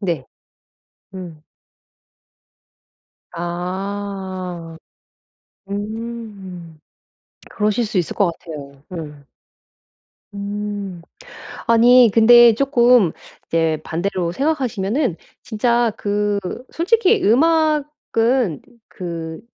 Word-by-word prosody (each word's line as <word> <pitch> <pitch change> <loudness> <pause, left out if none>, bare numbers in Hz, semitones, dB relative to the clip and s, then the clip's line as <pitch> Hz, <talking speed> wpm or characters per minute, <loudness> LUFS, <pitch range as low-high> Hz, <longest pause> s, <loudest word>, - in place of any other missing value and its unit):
네. 170 -9 -2 0.9
음. 170 -5 -9 1.9
아. 185 0 -5 0.9
음. 205 -6 -7 0.7
그러실 215 +2 0
수 205 - -1
있을 175 - -1
것 190 -4 +2
같아요. 140 -4 -10
음. 150 -4 -8 1.1
음. 200 -2 -5 0.6
아니 235 0 +6
근데 235 0 +7
쪼끔 245 - +4 0.3
이제 165 -2 +1
반대로 175 0 -2
생각하시면은 250 - -1 0.3
진짜 235 0 +1
그 205 0 0 0.3
솔직히 420 +4 +2
음악은 275 - +2 0.3
그 165 0 -7
205 Hz, 130 characters per minute, -20 LUFS, 175-235 Hz, 1.9 s, 근데